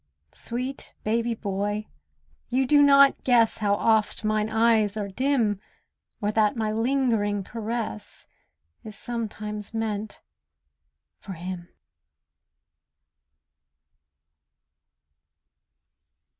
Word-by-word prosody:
Sweet 255 +3 -5
baby 230 +2 0
boy, 205 0 -2 0.6
you 260 +2 +2
do 290 +3 +5
not 280 -1 +6
guess 235 -3 +3
How 205 -2 +2
oft 220 0 +1
mine 215 0 +1
eyes 220 -2 +3
are 205 -2 -2
dim, 235 -3 +1 0.6
Or 205 0 0
that 215 0 +2
my 215 -1 0
lingering 225 -4 +1
caress 225 - -5 0.6
Is 215 -1 -9
sometimes 215 -2 -5
meant 215 -1 -3 1.0
for 195 - -8
him. 175 0 -7
220 Hz, 85 wpm, -26 LUFS, 205-235 Hz, 1.0 s, not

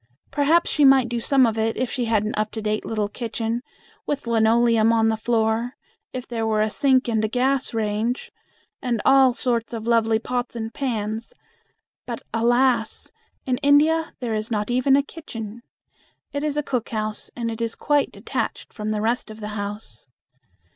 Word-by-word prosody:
Perhaps 310 +4 +3
she 295 - +2
might 270 -3 +6
do 235 0 -1
some 265 +2 +4
of 225 -1 0
it 225 0 0
if 255 0 -1
she 250 -3 -1
had 220 -2 +2
an 215 - -2
up 215 0 0
to 225 - -4
date 215 0 -1
little 215 -2 -1
kitchen, 230 +1 -3 0.5
with 285 -3 -2
linoleum 230 0 +4
on 225 -1 +3
the 220 - +1
floor, 225 +1 0 0.4
if 255 -1 -6
there 225 -2 -2
were 215 -1 +2
a 215 - -1
sink 265 -1 +3
and 220 -2 +1
a - - +2
gas 260 +4 0
range, 220 +2 -1 0.5
and 240 -3 -1
all 265 -2 +6
sorts 240 -3 -1
of 225 -1 -5
lovely 225 -1 +3
pots 245 +2 -3
and 225 -1 -4
pans, 225 - -3 0.7
but - - -5
alas! 240 0 +1 0.3
in 255 -1 0
India 305 +3 +3
there 235 -3 -2
is 215 0 -2
not 210 0 -1
even 255 +2 +4
a 280 - +3
kitchen. 235 -8 -8 0.7
It 285 0 -2
is 300 -1 -1
a 295 - +1
cook 250 -5 -2
house, 215 -1 -3
and 230 -1 -3
is 230 -1 -1
quite 290 -1 +1
detached - - -4
from 215 0 -4
the 215 -1 -1
rest 235 +2 0
of 215 0 -10
the 210 -1 -5
house. 205 - -5
230 Hz, 180 wpm, -23 LUFS, 220-255 Hz, 0.7 s, might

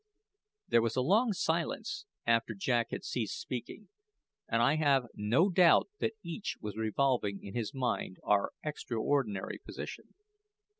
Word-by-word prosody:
There 115 - +4
was 115 -1 0
a 130 - +2
long 215 - +3
silence 195 - -1 0.2
after 115 -1 +2
Jack 120 +3 +1
had - - -5
ceased 115 -5 -2
speaking, 130 - -6 0.6
and 115 - +1
I 140 +6 +4
have 140 -4 +3
no 125 - +2
doubt 175 - +5
that 220 - 0
each 170 +4 -4
was 105 -2 -5
revolving 110 -2 0
in 100 - -8
his 115 -3 -2
mind 115 -7 -1
our 105 -1 +2
extraordinary 120 -7 -1
position. - - -8
125 Hz, 140 wpm, -32 LUFS, 110-160 Hz, 0.6 s, doubt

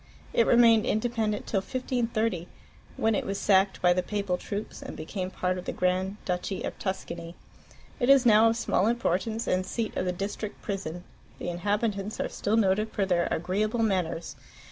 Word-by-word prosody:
It 230 - +3
remained 230 -2 +6
independent 220 -2 0
till 200 - 0
1530, 230 -5 -1 0.5
when 225 0 +2
it - - 0
was 195 0 -3
sacked 195 -1 +3
by 180 0 +6
the 180 - +1
Papal 200 -1 -1
troops 205 +3 -6
and - - -8
became 185 +4 -4
part 185 0 -1
of 180 - -9
the - - -2
Grand 185 +2 0
Duchy 180 +1 -2
of - - -5
Tuscany. 170 -3 -4 0.6
It 245 0 +1
is 275 -2 +7
now 225 0 +7
of 225 - 0
small 210 -3 +1
importance, 225 -1 0
and 185 0 +1
seat 220 +3 -3
of 185 - -1
the 180 - +1
district 200 +3 -5
prison. 180 -4 -4 0.3
The - - -4
inhabitants 205 +3 -1
are - - -1
still 210 +2 0
noted 210 +1 +2
for 200 - 0
their 175 -2 +1
agreeable 210 +7 0
manners. 180 -5 -1
200 Hz, 175 wpm, -28 LUFS, 180-225 Hz, 0.6 s, is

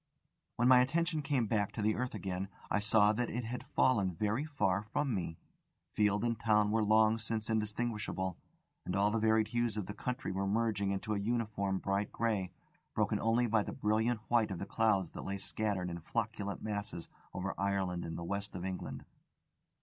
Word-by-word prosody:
When 120 - +2
my 125 -1 +8
attention 160 +4 +1
came 140 -4 +1
back 105 -2 0
to 110 - -3
the 110 +1 +3
earth 125 +3 -2
again, 95 0 -3 0.2
I - - +3
saw 105 0 +4
that 120 +2 -1
it 120 +2 -3
had 120 +2 -4
fallen 100 -9 +2
very 105 - 0
far 105 -12 +1
away 105 - -11
from 145 -2 0
me. 85 -5 -3 0.6
Field 105 0 +2
and 115 -2 0
town 105 -2 +3
were 110 0 +2
long 110 +1 +4
since 110 -1 -2
indistinguishable, 105 -4 -1 0.5
and 90 - -3
all 100 +2 +3
the 115 - +1
varied 110 0 +3
hues 120 -2 0
of 105 - -2
the 105 - -6
country 125 +5 -3
were 95 +1 -1
merging 105 -1 +1
into 100 +2 -1
a 100 - 0
uniform 105 -3 -1
bright 100 +2 -1
grey, 105 -6 0 0.4
broken - - +1
only 115 +2 +2
by 110 -2 +3
the - - -5
brilliant 110 0 +1
white 115 -2 +3
of 95 - -3
the 100 - -4
clouds 100 -6 +1
that - - -7
lay 100 0 -3
scattered 95 -3 -2
in 85 - -5
flocculent 105 +1 -3
masses 105 -4 -4 0.2
over 95 +1 -3
Ireland 95 -3 -1
and 80 - -5
the 85 - -5
west 100 +3 -3
of 90 0 -4
England. 95 -1 -5
105 Hz, 195 wpm, -33 LUFS, 100-115 Hz, 0.6 s, my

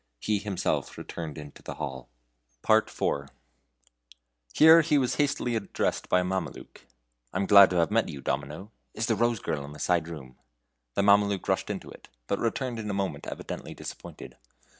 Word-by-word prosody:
He 105 - 0
himself 100 -2 -2
returned 80 -4 -6
into 75 -1 -10
the - - -7
hall. 65 -2 -6 0.6
IV. 70 -1 +2 1.2
Here 160 - +8
he 150 -2 +2
was 130 -3 +1
hastily 140 -4 0
addressed 110 -3 -2
by 90 - +4
a - - -1
Mameluke: 95 0 -5 0.4
"I'm 100 - -1
glad 100 -1 +8
I 90 - 0
have 85 - 0
met 115 +1 +2
you, 70 - -7
Domino. 75 - -4 0.2
Is 110 - -1
the 115 - +2
Rose 120 0 +1
girl 70 - -3
in 70 +1 -9
the - - -11
side 85 0 +1
room?" 70 -6 -10 0.6
The - - +2
Mameluke 100 -1 +3
rushed - - 0
into - - -5
it, - - -15 0.2
but 100 - -1
returned 120 +1 -2
in 105 -1 -4
a 100 - -2
moment 100 -1 -3
evidently - - -6
disappointed. - - -9
100 Hz, 170 wpm, -28 LUFS, 75-115 Hz, 1.2 s, Here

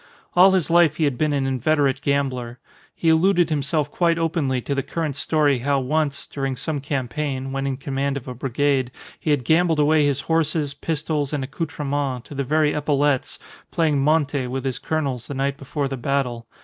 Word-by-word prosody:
All 185 +2 +8
his 185 -5 +1
life 170 -3 +5
he 160 - 0
had 140 -4 +1
been 155 +4 0
an 140 -2 0
inveterate 135 +1 +1
gambler. 130 -4 -1 0.4
He 165 - +1
alluded 175 +1 +3
himself 145 0 0
quite 170 -2 +2
openly 160 -6 0
to 140 - -3
the 140 - 0
current 155 0 -3
story 145 -2 +2
how 140 +2 +1
once, 145 +2 -1
during 135 -2 -3
some 145 +4 -3
campaign 135 0 -3
(when 135 0 -2
in 135 -1 -2
command 140 0 -2
of 135 - -9
a 125 - -4
brigade), 135 +1 0 0.3
he - - -3
had 145 -5 +1
gambled 165 +2 +3
away 150 +1 +4
his 140 -1 0
horses, 155 -2 0
pistols, 150 -1 -2
and 145 -2 -1
accoutrements, 140 -3 -3
to - - -8
the 140 0 -2
very 150 +2 +2
epaulettes, 145 -2 0 0.3
playing 155 -4 +1
monte 145 -3 +1
with 130 +2 -4
his 130 -2 -2
colonels 140 -6 -2
the 140 - -5
night 135 +1 0
before 140 +1 -3
the 135 0 -4
battle. 125 -3 -2
140 Hz, 190 wpm, -22 LUFS, 135-155 Hz, 0.4 s, All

